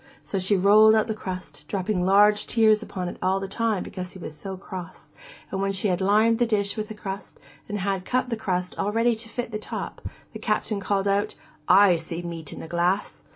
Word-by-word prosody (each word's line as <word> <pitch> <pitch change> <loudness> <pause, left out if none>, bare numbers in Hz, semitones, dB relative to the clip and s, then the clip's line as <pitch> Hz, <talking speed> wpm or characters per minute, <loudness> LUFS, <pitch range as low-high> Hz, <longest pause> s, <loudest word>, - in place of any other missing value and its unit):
So 195 - -3
she 190 +2 +2
rolled 215 +3 +6
out 220 - +3
the 220 - -2
crust, 185 -4 -7
dropping 195 -1 -1
large 205 +2 +4
tears 220 -2 +4
upon 185 -4 -5
it - - -6
all 190 +1 +1
the 195 - -4
time 220 0 -1
because 185 -1 -7
he - - -10
was 155 -3 -7
so 190 +4 -7
cross, 185 -2 -9 0.4
and 195 - -2
when 195 0 +1
she 195 +2 +1
had 180 0 0
lined 215 +4 +3
the 240 - +3
dish 200 -3 +1
with 215 -1 -4
crust 195 -1 -7 0.3
and 210 - -2
had 195 -1 -1
cut 255 +4 -1
the - - +1
crust 180 -4 -2
all 205 - 0
ready 230 +2 +2
to 225 +1 -6
fit 240 0 -4
the 215 - -3
top, - - -5 0.3
the - - -7
Captain 210 -3 -1
called 195 0 0
out, 200 +1 +1 0.3
'I 195 -3 +6
see 165 +1 -5
the 175 - -6
meat 165 -3 -7
in - - -8
the - - -8
glass! 175 +4 0
200 Hz, 225 wpm, -25 LUFS, 185-215 Hz, 0.4 s, rolled